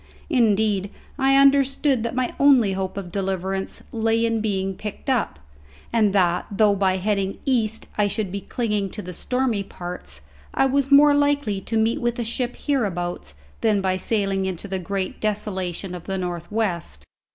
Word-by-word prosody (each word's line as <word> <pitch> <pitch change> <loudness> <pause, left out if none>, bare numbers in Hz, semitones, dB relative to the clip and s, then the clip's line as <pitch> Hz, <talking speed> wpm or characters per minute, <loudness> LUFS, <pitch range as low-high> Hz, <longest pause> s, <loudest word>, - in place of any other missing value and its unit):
Indeed 210 - +2 0.3
I 270 0 +4
understood 275 -1 +4
that 235 +2 -3
my 255 -1 -1
only 260 -8 +5
hope 190 0 -3
of 185 -3 -5
deliverance 190 0 -3
lay 225 0 +1
in 230 -1 0
being 195 -3 -1
picked 210 +7 -5
up; 230 - 0 0.6
and 215 -3 +3
that, 180 -3 +2
though 205 0 +3
by 190 -1 +1
heading 195 0 -1
east 225 -4 0
I 205 - +4
should 205 -2 -2
be 200 +1 -4
clinging 210 -4 -2
to 210 - -5
the 180 - -7
stormy 250 +1 -1
parts, 180 - -7 0.3
I - - +4
was 275 +1 +1
more 290 +1 +7
likely 285 -8 +1
to 225 +3 -2
meet 225 +1 +1
with 240 0 0
a 240 - -1
ship 240 +2 -2
hereabouts 175 - -2 0.3
than 215 -2 +3
by 190 -1 0
sailing 195 -1 0
into 190 +1 -5
the 190 -1 -3
great 190 +1 -3
desolation 195 -4 -2
of 175 -2 -8
the 195 -1 -2
north 175 -1 -4
west. 170 - -2
205 Hz, 170 wpm, -23 LUFS, 190-235 Hz, 0.6 s, more